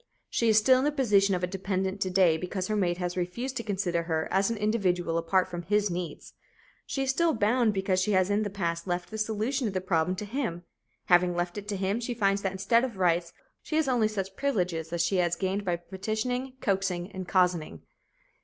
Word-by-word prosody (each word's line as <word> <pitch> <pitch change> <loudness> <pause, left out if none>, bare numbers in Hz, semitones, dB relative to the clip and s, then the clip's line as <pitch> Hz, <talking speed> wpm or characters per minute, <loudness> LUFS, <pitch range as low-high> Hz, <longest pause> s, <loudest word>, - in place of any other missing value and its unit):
She 230 - +2
is 215 - +5
still 255 +4 +5
in - - 0
the 295 - +2
position 205 -9 +3
of 180 - -3
a - - +4
dependent 190 +1 -2
to 185 - +1
day 180 -3 +4
because 180 +3 -3
her 215 - +1
mate 175 -4 +1
has 180 -1 -3
refused 210 +9 -3
to 230 - -3
consider 190 -5 -1
her 160 -1 -1
as 195 +2 +2
an 230 - -2
individual 190 -6 0
apart 170 +3 +2
from 175 -2 -5
his 205 +2 +1
needs. 175 -3 -5 0.5
She 270 - -1
is 265 - +2
still 330 +2 +2
bound 225 +2 +2
because 190 -1 +1
she 210 +3 +1
has 185 +1 +3
in 205 +1 +2
the 210 - -1
past 170 -3 -3
left 175 +1 -2
the 220 - -5
solution 220 +4 -1
of 195 - -4
the - - +2
problem 180 -1 0
to 210 - -5
him. 205 -7 -3 0.4
Having 175 0 +4
left 175 0 -2
it 205 - -11
to 205 -1 -2
him, 195 +4 0
she 240 0 -3
finds 200 -3 +1
that 195 - -1
instead 205 +5 +2
of 240 -6 -3
rights, 170 -2 +1 0.3
she 310 - -4
has 315 -2 +2
only 240 -4 +3
such 195 -3 -4
privileges 180 - -1
as 170 0 +1
she 190 +2 0
has 175 -1 +2
gained 190 +3 -2
by 180 -3 0
petitioning, 220 +9 -3
coaxing 190 -2 -1
and 185 -2 -6
cozening. 175 - +1
190 Hz, 225 wpm, -28 LUFS, 180-215 Hz, 0.5 s, is